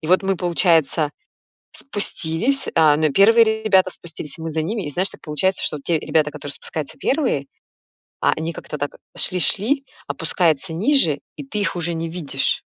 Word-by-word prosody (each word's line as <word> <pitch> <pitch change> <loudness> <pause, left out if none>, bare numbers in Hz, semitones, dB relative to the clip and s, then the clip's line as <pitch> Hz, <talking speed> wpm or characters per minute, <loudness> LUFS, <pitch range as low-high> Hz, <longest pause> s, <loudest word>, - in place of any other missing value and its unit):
И 155 - -7
вот 185 +3 +4
мы, 195 0 0
получается, 165 -3 +2 0.6
спустились, 220 +2 -2
а, 155 -3 +6
но 155 0 +2
первые 220 +5 +5
ребята 190 -3 +4
спустились, 165 -3 -8
и - - -8
мы 160 -1 -4
за 160 - -1
ними. 205 +3 -3
И - - -3
знаешь, 185 +6 0
так - - -15
получается, 155 +5 0
что 150 - -2
те 165 -3 +1
ребята, 150 -2 +1
которые 145 -1 -6
спускаются 155 - -6
первые, 260 - 0 0.7
а, - - +3
они 160 +1 -3
как-то 150 - -7
так 145 0 -3 0.2
шли 180 - +1
шли, 245 - +1 0.2
опускаются 165 -1 0
ниже, 185 - +3 0.2
и 145 - -7
ты 210 - -3
их 175 -5 -1
уже 170 -1 0
не 165 0 -3
видишь. 150 -6 -1
170 Hz, 180 wpm, -21 LUFS, 155-200 Hz, 0.7 s, а